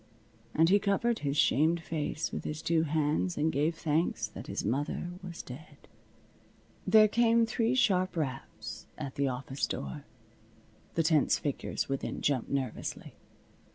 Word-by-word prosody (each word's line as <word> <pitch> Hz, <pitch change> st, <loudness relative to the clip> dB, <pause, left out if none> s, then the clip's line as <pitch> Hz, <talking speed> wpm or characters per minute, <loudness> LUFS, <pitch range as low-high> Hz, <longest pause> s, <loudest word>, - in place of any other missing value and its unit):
And 165 Hz, +2 st, +5 dB
he 200 Hz, +2 st, +6 dB
covered 220 Hz, +4 st, +1 dB
his 140 Hz, 0 st, -1 dB
shamed 155 Hz, +4 st, +3 dB
face 155 Hz, 0 st, -2 dB
with -, -, -4 dB
his 155 Hz, +1 st, -5 dB
two 165 Hz, -1 st, +2 dB
hands 155 Hz, +3 st, 0 dB
and 155 Hz, +2 st, +2 dB
gave 155 Hz, +4 st, +1 dB
thanks 160 Hz, +1 st, 0 dB
that -, -, -9 dB
his -, -, -3 dB
mother 145 Hz, +6 st, -1 dB
was 175 Hz, -3 st, -7 dB
dead. 145 Hz, +3 st, -12 dB, 1.0 s
There 215 Hz, +2 st, +7 dB
came 230 Hz, +1 st, +4 dB
three 230 Hz, +2 st, +1 dB
sharp 185 Hz, -7 st, +2 dB
raps 135 Hz, -6 st, -5 dB
at 140 Hz, -3 st, -5 dB
the 140 Hz, -1 st, 0 dB
office 135 Hz, +1 st, -2 dB
door. 70 Hz, -1 st, -5 dB, 0.9 s
The 165 Hz, -, +2 dB
tense 155 Hz, -3 st, +3 dB
figures 145 Hz, -3 st, -2 dB
within 135 Hz, 0 st, -3 dB
jumped 135 Hz, -5 st, 0 dB
nervously. 130 Hz, -5 st, -3 dB
155 Hz, 145 wpm, -30 LUFS, 140-185 Hz, 1.0 s, There